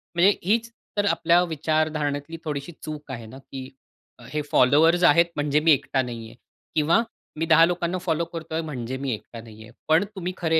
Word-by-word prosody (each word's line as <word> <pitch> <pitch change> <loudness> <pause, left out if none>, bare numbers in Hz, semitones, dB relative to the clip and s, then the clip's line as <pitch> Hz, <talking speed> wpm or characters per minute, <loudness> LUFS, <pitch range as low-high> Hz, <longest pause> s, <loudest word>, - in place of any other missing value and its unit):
म्हणजे 185 +4 +6
हीच 230 +4 +1 0.3
तर 205 - +2
आपल्या 170 -2 +3
विचारधारणेतली 155 -1 -1
थोडीशी 145 +1 -4
चूक 150 -2 -7
आहे 115 -3 -6
ना, 120 +4 -11
की 135 -1 -9 0.6
हे 150 - 0
फॉलोअर्स 160 +7 +4
आहेत 170 +1 +6
म्हणजे 145 0 +1
मी 160 +1 +4
एकटा 135 -1 +2
नाही 120 -3 -6
आहे - - -15 0.4
किंवा 160 +7 +3 0.4
मी 165 - +1
10 165 0 +6
लोकांना 175 +1 -1
फॉलो 170 -2 -1
करतोय 165 -1 -5
म्हणजे 130 -5 -5
मी 135 -1 -3
एकटा 115 +1 -8
नाहीये. 110 -1 -13 0.2
पण 160 +4 +4
तुम्ही 185 -1 -4
खरे 160 -2 +2
155 Hz, 175 wpm, -24 LUFS, 135-170 Hz, 0.6 s, म्हणजे